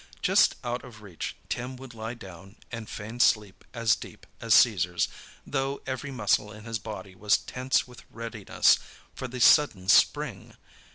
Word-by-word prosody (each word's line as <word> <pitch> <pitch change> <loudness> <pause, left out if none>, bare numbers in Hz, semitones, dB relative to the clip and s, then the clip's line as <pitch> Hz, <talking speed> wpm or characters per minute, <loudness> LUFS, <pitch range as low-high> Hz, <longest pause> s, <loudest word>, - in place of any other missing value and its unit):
Just - - +4
out 120 0 -3
of 105 -3 -13
reach, 95 -5 -6
Tim 125 +2 -4
would 130 -1 -11
lie 110 +1 -6
down 95 -2 -12 0.2
and 115 -2 -6
feign 110 +3 -7
sleep 105 -5 +2
as 115 -3 +2
deep - - -11
as - - +3
Caesar's, - - +4 0.4
though 135 0 -2
every 130 +2 -4
muscle 105 -4 +1
in 105 0 -11
his 115 -1 -4
body 100 -2 -8
was 105 +3 +2
tense 130 +1 -1
with 125 -1 -13
readiness 115 -3 +1 0.3
for 130 - -5
the 125 +1 -7
sudden 115 -8 +5
spring. - - +3
115 Hz, 160 wpm, -27 LUFS, 105-125 Hz, 0.4 s, sudden